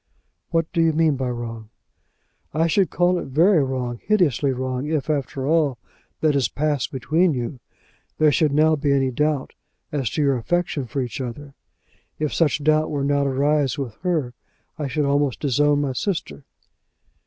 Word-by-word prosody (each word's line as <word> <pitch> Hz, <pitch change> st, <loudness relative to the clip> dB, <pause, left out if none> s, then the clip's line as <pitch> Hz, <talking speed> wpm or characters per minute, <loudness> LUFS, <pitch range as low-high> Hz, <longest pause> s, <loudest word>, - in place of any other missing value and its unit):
"What 165 Hz, -1 st, +1 dB
do 165 Hz, -, +2 dB
you 165 Hz, -1 st, +3 dB
mean 155 Hz, -2 st, +2 dB
by 130 Hz, -1 st, -2 dB
wrong?" 115 Hz, -2 st, -6 dB, 0.9 s
"I 160 Hz, +1 st, +3 dB
should 185 Hz, +3 st, +2 dB
call 180 Hz, 0 st, +2 dB
it -, -, -6 dB
very 160 Hz, +4 st, +4 dB
wrong, 125 Hz, -3 st, -3 dB
hideously 165 Hz, -, +2 dB
wrong, 130 Hz, +1 st, -3 dB
if 155 Hz, -2 st, -1 dB
after 135 Hz, -2 st, -2 dB
all 150 Hz, -4 st, +2 dB, 0.4 s
that 155 Hz, -2 st, +3 dB
has 135 Hz, -5 st, +2 dB
passed 145 Hz, +3 st, -1 dB
between 155 Hz, +5 st, +1 dB
you, 120 Hz, +1 st, -4 dB, 0.6 s
there 155 Hz, -1 st, +4 dB
should 150 Hz, +1 st, +2 dB
now 155 Hz, +2 st, +4 dB
be 145 Hz, -1 st, +1 dB
any 135 Hz, -1 st, +1 dB
doubt 150 Hz, +1 st, -1 dB, 0.4 s
as 135 Hz, -6 st, -1 dB
to 150 Hz, -, -1 dB
your 140 Hz, -2 st, +2 dB
affection 150 Hz, 0 st, -1 dB
for 135 Hz, +4 st, -2 dB
each 125 Hz, +3 st, -5 dB
other. 135 Hz, +3 st, -7 dB, 0.6 s
If 150 Hz, -1 st, -2 dB
such 155 Hz, -2 st, +1 dB
doubt 155 Hz, +1 st, +3 dB
were 145 Hz, -2 st, -2 dB
now 140 Hz, 0 st, +1 dB
to -, -, +1 dB
arise 140 Hz, 0 st, +1 dB
with 135 Hz, -6 st, -4 dB
her, 160 Hz, -9 st, -1 dB, 0.4 s
I 150 Hz, -, -3 dB
should 145 Hz, +2 st, -1 dB
almost 140 Hz, -2 st, +1 dB
disown 145 Hz, +1 st, +2 dB
my 140 Hz, -2 st, -1 dB
sister." 130 Hz, -, -3 dB
145 Hz, 175 wpm, -22 LUFS, 130-155 Hz, 0.9 s, very